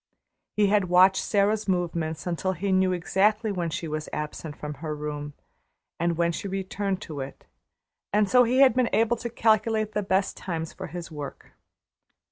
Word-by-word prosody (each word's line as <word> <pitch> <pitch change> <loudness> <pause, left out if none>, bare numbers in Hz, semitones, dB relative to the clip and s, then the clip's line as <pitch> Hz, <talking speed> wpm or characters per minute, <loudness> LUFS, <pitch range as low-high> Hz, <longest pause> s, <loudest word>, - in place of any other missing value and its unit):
He 210 - +5
had 200 -2 +2
watched 185 +2 +5
Sara's 210 +1 +1
movements 170 -3 -1
until 180 +2 -1
he 195 +2 -2
knew 185 0 +3
exactly 205 +5 +1
when 175 -4 -2
she 165 +1 -4
was 155 0 -4
absent 150 0 -5
from 150 0 -5
her 155 -2 -3
room 150 -1 -5 0.6
and 170 0 0
when 170 0 +2
she 185 - -5
returned 195 +1 -3
to 150 -4 -7
it, 135 +1 -7 0.7
and 210 0 +3
so 250 +4 +6
he 250 +3 +3
had 270 -1 +7
been 250 -2 +2
able 230 +2 +3
to 235 - -5
calculate 220 -1 +2
the 210 - -1
best 190 0 0
times 165 -3 -4
for - - -7
his 170 0 -7
work. 145 -2 -8
185 Hz, 175 wpm, -26 LUFS, 160-210 Hz, 0.7 s, had